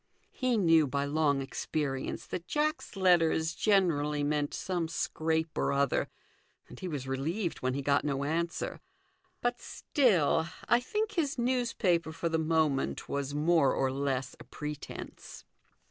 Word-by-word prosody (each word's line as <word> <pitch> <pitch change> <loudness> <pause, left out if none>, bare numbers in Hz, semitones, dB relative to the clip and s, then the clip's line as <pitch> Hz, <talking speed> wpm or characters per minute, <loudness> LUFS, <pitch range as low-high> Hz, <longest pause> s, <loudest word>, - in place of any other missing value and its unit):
He 255 -2 0
knew 165 -6 +5
by 140 +2 -1
long 145 -2 +1
experience 135 0 -3
that 170 -1 -6
Jack's 300 - -1
letters 165 -4 +3
generally 160 -7 +2
meant 145 0 0
some 175 -3 -2
scrape 160 0 -1
or - - +1
other, 140 -1 +1 0.6
and - - -12
he 185 - -4
was 145 -6 -4
relieved 160 +8 -2
when 130 0 -1
he 140 - -3
got 140 +1 +2
no 140 -2 -1
answer; 165 +3 -2 0.6
but 245 0 0
still, 180 - +2 0.2
I 235 +2 +5
think, 425 - -2
his 320 -10 -1
news 245 0 0
paper 170 -5 +1
for 165 +1 -2
the 160 0 +1
moment 155 -4 0
was 140 0 -3
more 155 -2 +3
or 135 -1 +1
less 135 -1 -2
a - - -10
pretence. 150 -1 -8
160 Hz, 145 wpm, -30 LUFS, 140-185 Hz, 0.6 s, knew